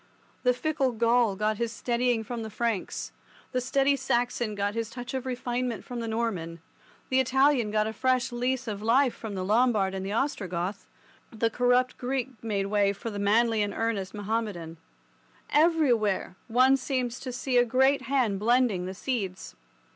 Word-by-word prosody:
The 250 - +4
fickle 265 0 0
Gaul 230 -2 +3
got 210 +1 0
his 235 0 -1
steadying 240 -1 0
from 235 +1 -5
the 220 - -5
Franks, 220 -2 -2 0.4
the 255 - 0
steady 275 +2 +2
Saxon 240 -4 -1
got 200 0 -1
his 230 -1 -3
touch 245 +1 -7
of 260 0 -3
refinement 245 -1 -2
from 245 -1 -5
the 230 - -3
Norman, 205 -8 -2 0.5
the 260 - +3
Italian 265 -2 +3
got 215 0 +1
a 220 - -3
fresh 255 +1 +1
lease 250 +1 -1
of 205 -2 -4
life 245 +4 +3
from 215 -3 -7
the 185 -1 -3
Lombard 215 -2 +2
and 190 0 -4
the 195 - -4
Ostrogoth, 195 - -2 0.4
the 225 0 0
corrupt 245 +2 +2
Greek 260 0 -2
made 205 -3 -1
way 200 0 +2
for 225 +3 -6
the 205 - -5
manly 220 +2 +3
and 205 -1 -1
earnest 220 -4 -2
Mahommedan. 205 -6 -3 0.7
Everywhere 255 - +2
one 255 +3 +4
seems 255 -2 -2
to 255 - -5
see 250 +1 -1
a - - +6
great 265 +3 +3
hand 245 -6 0
blending 225 -5 +2
the 190 - -6
seeds. 195 -5 -4
235 Hz, 170 wpm, -27 LUFS, 210-255 Hz, 0.7 s, a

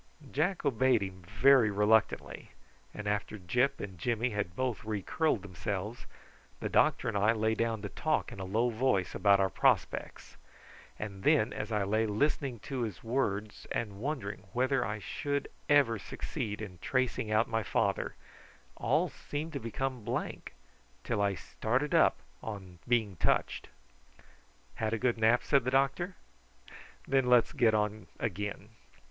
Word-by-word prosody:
Jack 165 +4 0
obeyed 130 -4 +3
him 95 -1 -7
very 115 +6 +5
reluctantly, 105 +2 +1 0.4
and 105 - -7
after 105 +1 -1
Gyp 125 +9 +1
and 95 -3 -7
Jimmy 120 +5 0
had 105 -4 -3
both 130 -2 -2
re 105 -2 -3
curled 155 - 0
themselves, 100 +3 -4 0.5
the - - -3
doctor - - +3
and 115 - -1
I 105 +3 +4
lay 110 0 +1
down 115 -2 -1
to 105 - -3
talk 155 +8 -1
in - - -9
a - - -4
low 110 +6 +1
voice 115 -5 +1
about 100 -1 +4
our 95 -1 +2
prospects, - - 0 0.6
and 100 -2 -6
then 110 +4 +3
as 105 +2 -5
I 105 -2 +1
lay 110 +3 +1
listening 130 +3 0
to 130 +2 -4
his 105 -7 -4
words, 110 -4 -2
and 105 -4 -3
wondering 110 -7 -4
whether 130 +1 +2
I 105 -2 -3
should 140 +7 -3 0.2
ever 135 -7 +4
succeed 105 +1 -5
in 90 -5 -9
tracing 130 -1 0
out 110 +2 +3
my 115 -1 0
father, 100 -2 0 0.6
all - - +2
seemed 155 +3 -6
to 140 - -2
become 125 +1 -3
blank, 120 +4 -4 0.5
till 115 -4 -1
I 100 -1 +2
started 125 +10 -2
up - - +5 0.2
on 95 -5 -7
being 110 -6 +1
touched. - - 0 1.1
"Had 110 0 -1
a - - +1
good 120 0 0
nap?" 115 +2 +4
said 140 -3 +3
the 125 - 0
doctor. 135 +8 +1 0.9
"Then 135 -2 +2
let's 125 -2 +5
get 115 -5 +3
on 105 -1 -1
again." 105 +1 -3
110 Hz, 155 wpm, -31 LUFS, 105-130 Hz, 1.1 s, very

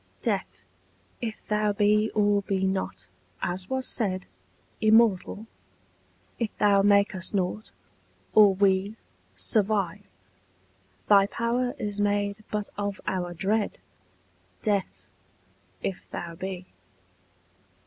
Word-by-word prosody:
Death, - - -2 0.6
if 225 -3 -5
thou 210 -1 +1
be 210 +1 +3
or 205 -1 +3
be 190 -1 -1
not, 190 - -2 0.4
as 180 +1 -2
was 260 0 -1
said, 190 -5 -1 0.6
Immortal; 215 -2 +3 0.9
if 230 -3 0
thou 200 -1 +4
make 200 0 +4
us 185 +2 -3
nought, 195 +3 -2 0.6
or 205 -3 +7
we 195 +1 +2 0.4
Survive: 200 - 0 1.1
thy 200 -1 +6
power 240 +3 -1
is 205 0 -3
made 205 0 +1
but 210 -1 -3
of 200 -1 -2
our 175 -2 -2
dread, 205 +5 0 0.9
Death, 200 -3 -1 0.8
if 190 - -4
thou 170 -1 -5
be. 185 +1 -6
205 Hz, 105 wpm, -27 LUFS, 190-215 Hz, 1.1 s, or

